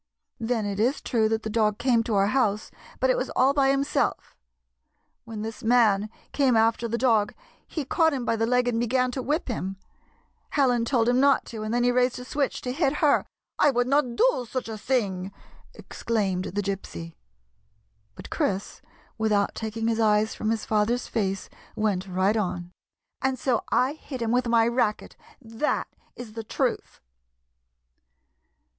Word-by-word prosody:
Then 225 Hz, -1 st, -1 dB
it 200 Hz, 0 st, -3 dB
is 245 Hz, +6 st, +2 dB
true 220 Hz, -3 st, +1 dB
that 225 Hz, 0 st, -1 dB
the 220 Hz, -, -3 dB
dog 210 Hz, -2 st, +1 dB
came 240 Hz, -2 st, +2 dB
to 225 Hz, -3 st, -1 dB
our 195 Hz, 0 st, +4 dB
house, 215 Hz, -5 st, 0 dB, 0.3 s
but -, -, +3 dB
it -, -, +2 dB
was -, -, -2 dB
all 265 Hz, +2 st, +4 dB
by 275 Hz, -1 st, +3 dB
himself. 275 Hz, +1 st, 0 dB, 0.9 s
When 220 Hz, -2 st, -6 dB
this 225 Hz, +2 st, -6 dB
man 220 Hz, -3 st, +3 dB, 0.2 s
came 265 Hz, -5 st, +3 dB
after 225 Hz, +1 st, +2 dB
the 230 Hz, +1 st, -2 dB
dog, 225 Hz, -5 st, +2 dB, 0.3 s
he 305 Hz, -4 st, -4 dB
caught 320 Hz, +4 st, +3 dB
him 260 Hz, -4 st, -3 dB
by 230 Hz, -, +1 dB
the 225 Hz, 0 st, 0 dB
leg 250 Hz, 0 st, +2 dB
and 235 Hz, -2 st, 0 dB
began 250 Hz, +2 st, +1 dB
to 260 Hz, -, -3 dB
whip 300 Hz, +6 st, -1 dB
him, 195 Hz, -5 st, -3 dB, 0.7 s
Helen 250 Hz, -5 st, +2 dB
told 235 Hz, -2 st, +1 dB
him 245 Hz, +1 st, +3 dB
not 280 Hz, 0 st, +4 dB
to, 220 Hz, -, -5 dB
and 215 Hz, 0 st, -3 dB
then 240 Hz, +1 st, +1 dB
he 245 Hz, -, +4 dB
raised 250 Hz, 0 st, +2 dB
a 250 Hz, -, -8 dB
switch 280 Hz, +1 st, -2 dB
to 250 Hz, -, -3 dB
hit 275 Hz, 0 st, +1 dB
her—" 300 Hz, -1 st, +2 dB, 0.2 s
" -, -, -57 dB
I 295 Hz, -, +5 dB
would 245 Hz, -2 st, +1 dB
not 255 Hz, -2 st, +1 dB
do 470 Hz, -, +2 dB
such 255 Hz, -3 st, -3 dB
a 220 Hz, -, -5 dB
thing! 200 Hz, -5 st, -1 dB, 0.2 s
" -, -, -27 dB
exclaimed 195 Hz, -5 st, -2 dB
the 205 Hz, +3 st, -3 dB
Gypsy. 190 Hz, -4 st, -5 dB, 1.0 s
But -, -, -11 dB
Chris, 195 Hz, 0 st, -2 dB, 0.4 s
without 210 Hz, -2 st, +1 dB
taking 225 Hz, 0 st, -3 dB
his 230 Hz, 0 st, 0 dB
eyes 215 Hz, 0 st, +3 dB
from 215 Hz, -, -3 dB
his 225 Hz, -1 st, -1 dB
father's 220 Hz, +3 st, +1 dB
face, 195 Hz, -4 st, -2 dB, 0.3 s
went 205 Hz, -4 st, -1 dB
right 190 Hz, +3 st, +1 dB
on 180 Hz, -4 st, -2 dB, 0.2 s
— -, -, -64 dB
" -, -, -55 dB
and 265 Hz, -1 st, 0 dB
so 245 Hz, -2 st, 0 dB
I 260 Hz, +3 st, +2 dB
hit 290 Hz, -4 st, -8 dB
him 225 Hz, -, -1 dB
with 250 Hz, 0 st, +1 dB
my 230 Hz, -1 st, +4 dB
racket. 235 Hz, -3 st, -1 dB, 0.2 s
That 230 Hz, +2 st, -2 dB, 0.3 s
is 240 Hz, -3 st, -9 dB
the 225 Hz, 0 st, -5 dB
truth." -, -, -2 dB
230 Hz, 185 wpm, -26 LUFS, 215-255 Hz, 1.0 s, I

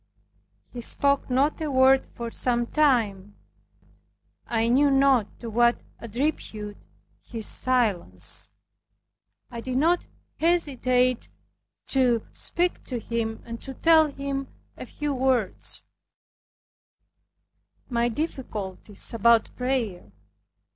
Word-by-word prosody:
He 245 Hz, -, -6 dB
spoke 280 Hz, +3 st, +1 dB
not 275 Hz, +5 st, +1 dB
a 310 Hz, -, -1 dB
word 265 Hz, 0 st, +4 dB
for 235 Hz, -1 st, -7 dB
some 240 Hz, -1 st, 0 dB
time. 225 Hz, -9 st, +1 dB, 1.1 s
I 225 Hz, -1 st, +1 dB
knew 275 Hz, +4 st, +4 dB
not 270 Hz, -5 st, +4 dB
to 235 Hz, -, -6 dB
what 240 Hz, +2 st, +3 dB, 0.2 s
attribute 225 Hz, -4 st, -3 dB, 0.4 s
his 225 Hz, -3 st, -5 dB
silence. 205 Hz, -, +2 dB, 1.0 s
I 235 Hz, -1 st, -6 dB
did 255 Hz, +1 st, -3 dB
not 335 Hz, +5 st, +2 dB, 0.3 s
hesitate 255 Hz, -7 st, +1 dB, 0.6 s
to 245 Hz, -4 st, +2 dB
speak 350 Hz, +1 st, -1 dB
to 250 Hz, -, -4 dB
him, 225 Hz, -1 st, -3 dB
and 230 Hz, 0 st, -7 dB
to 265 Hz, -1 st, -7 dB
tell 320 Hz, +1 st, +5 dB
him 275 Hz, -1 st, -4 dB, 0.3 s
a -, -, -9 dB
few 295 Hz, -1 st, -3 dB
words, 255 Hz, -6 st, -1 dB, 2.0 s
my 235 Hz, -1 st, +1 dB
difficulties 215 Hz, -, -5 dB
about 230 Hz, 0 st, +3 dB
prayer. 235 Hz, -, -2 dB
250 Hz, 100 wpm, -25 LUFS, 230-275 Hz, 2.0 s, tell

